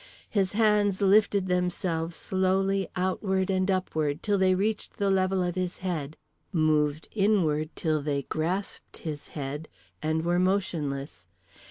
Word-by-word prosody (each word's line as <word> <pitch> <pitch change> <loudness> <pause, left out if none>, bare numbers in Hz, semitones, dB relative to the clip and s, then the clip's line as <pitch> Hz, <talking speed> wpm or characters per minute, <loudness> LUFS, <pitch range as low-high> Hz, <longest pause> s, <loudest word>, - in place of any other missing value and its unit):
His 195 -3 +1
hands 210 -3 +3
lifted 200 -1 +4
themselves 180 -2 -1
slowly 190 +1 +1
outward 190 +1 0
and 185 0 +1
upward 155 -6 -1
till 205 -2 +1
they 185 -1 +4
reached 210 +3 -2
the 200 -1 +1
level 190 -1 +2
of 175 0 -1
his 185 0 -3
head; 160 -5 -4 0.3
moved 155 -3 +1
inward 180 -8 +2
till 155 -2 0
they 140 -1 -1
grasped 175 +8 -3
his 150 -2 -5
head: 145 +2 -4 0.3
and 160 +1 0
were 175 +1 +2
motionless. 150 - -1
185 Hz, 135 wpm, -27 LUFS, 155-195 Hz, 0.3 s, lifted